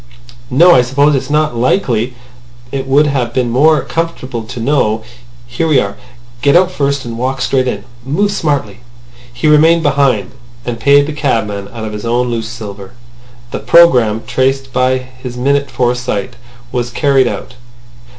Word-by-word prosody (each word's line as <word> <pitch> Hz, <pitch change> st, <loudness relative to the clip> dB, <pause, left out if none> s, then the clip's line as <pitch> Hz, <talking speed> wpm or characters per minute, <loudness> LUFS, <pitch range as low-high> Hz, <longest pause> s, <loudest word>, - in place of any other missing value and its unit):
"No. 170 Hz, +7 st, +6 dB
I 125 Hz, -, +6 dB
suppose 140 Hz, +4 st, +2 dB
it's 135 Hz, 0 st, -2 dB
not 150 Hz, -2 st, +1 dB
likely. 125 Hz, -, 0 dB, 0.6 s
It 135 Hz, -1 st, -4 dB
would 140 Hz, +3 st, +4 dB
have 125 Hz, -5 st, -2 dB
been 125 Hz, -2 st, 0 dB
more 150 Hz, +5 st, +3 dB
comfortable 150 Hz, -8 st, -4 dB
to 115 Hz, -, -8 dB
know.... 115 Hz, -4 st, 0 dB, 0.4 s
Here 125 Hz, +7 st, -2 dB
we 150 Hz, -4 st, +4 dB
are. 100 Hz, -2 st, -3 dB, 0.5 s
Get 140 Hz, +3 st, +3 dB
out 185 Hz, +1 st, +4 dB
first, 140 Hz, -5 st, -1 dB
and 115 Hz, -1 st, -6 dB
walk 130 Hz, +2 st, -2 dB
straight 130 Hz, 0 st, 0 dB
in. 125 Hz, -, -3 dB, 0.2 s
Move 170 Hz, -, 0 dB
smartly." 140 Hz, -, -2 dB, 0.5 s
He 120 Hz, +5 st, -5 dB
remained 160 Hz, +2 st, +5 dB
behind, 135 Hz, -, +1 dB, 0.3 s
and 120 Hz, -1 st, -4 dB
paid 140 Hz, +4 st, +4 dB
the 155 Hz, -, -5 dB
cabman 105 Hz, -9 st, -2 dB
out 115 Hz, -1 st, -6 dB
of 105 Hz, -, -6 dB
his 105 Hz, -, -6 dB
own 120 Hz, +1 st, 0 dB
loose 115 Hz, -1 st, -3 dB
silver. 100 Hz, -4 st, -9 dB, 0.6 s
The -, -, -4 dB
programme 125 Hz, -11 st, +4 dB
traced 130 Hz, +2 st, -1 dB
by 130 Hz, +1 st, +2 dB
his 125 Hz, -1 st, -9 dB
minute 140 Hz, +2 st, 0 dB
foresight 125 Hz, -5 st, -2 dB, 0.4 s
was 120 Hz, -1 st, -2 dB
carried 135 Hz, 0 st, +2 dB
out. 125 Hz, -, -5 dB
130 Hz, 160 wpm, -14 LUFS, 120-145 Hz, 0.6 s, No